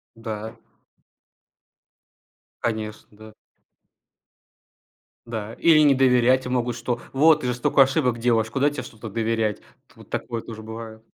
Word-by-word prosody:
Да. 110 0 -6 2.1
Конечно, 110 -2 -3
да. 110 +1 -14 1.9
Да. 110 -1 -5
Или 165 -2 +5
не 145 -2 +5
доверять, 130 0 +3
и - - -3
могут 125 -1 -1
что: 120 -1 -3
"Вот 155 +3 +5
ты 125 - -4
же 125 - 0
столько 125 +3 +3
ошибок 130 -3 +1
делаешь, 115 -2 +1
куда 140 +5 +2
тебе 145 - -5
что-то 110 0 -10
доверять?" 110 -1 -1 0.3
Т - - -25
вот - - -16
такое 115 -2 -4
тоже 110 -1 -9
бывает. 110 0 -9
115 Hz, 135 wpm, -23 LUFS, 110-130 Hz, 2.1 s, Или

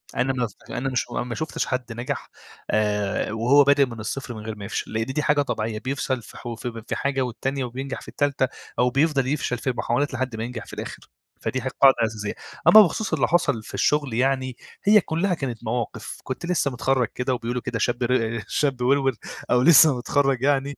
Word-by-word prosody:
أنا 135 +1 +1
ما 125 -2 -1
ف 105 - -16
أنا 135 +1 -2
مش 130 - 0
أنا - - -1
ما 120 -1 -5
شُفتش 155 -1 -2
حد 125 -2 -3
نجح، 120 +2 -4 0.4
آآ 105 -1 0
وهو 125 +6 +5
بادئ 140 0 +5
من 115 -3 -9
الصفر 120 +3 -4
من 110 - -8
غير 110 - -4
ما 100 -1 -8
يفشل، - - -4
لإن 110 0 0
دي 135 +4 -2
حاجة 150 -1 +3
طبيعية، 110 -5 -2
بيفشل 130 0 -2
في - - -13
ح - - -12
في 115 -2 -6
في - - -2
حاجة 140 -1 -1
والتانية 130 +2 -2
وبينجح 130 +2 -5
في - - -14
التالتة، 140 -2 0 0.3
أو 125 - +4
بيفضل 140 0 +2
يفشل 135 -3 -1
في 130 - -1
محاولات 120 +8 0
لحد 130 -2 -2
ما 110 - -3
ينجح 120 -1 -6
في - - -13
الآخر، - - -7 0.3
فدي 130 - -2
ح 130 - -4
قاعدة 135 0 +5
أساسية، 105 -2 -4 0.3
أمّا 215 - +11
بخصوص 200 +1 0
اللي 155 - +2
حصل 145 -9 +1
في - - -12
الشغل 145 -4 +1
يعني، 130 +1 0 0.3
هي 210 0 +6
كلّها 180 +4 0
كانت 130 -8 -4
مواقف، 120 +1 -4
كنت 130 +6 -5
لسّه 165 -5 +1
متخرّج 125 0 +1
كده 125 +1 -1
وبيقولوا 120 0 -3
كده 115 -1 -3
شاب 120 +3 0
ر 115 -2 0
شاب 135 -4 0
وروِر، 135 0 +2 0.4
أو 125 - +4
لسّه 150 -1 +7
متخرّج 135 0 +1
يعني، 140 0 +1
130 Hz, 210 wpm, -24 LUFS, 120-140 Hz, 0.4 s, أمّا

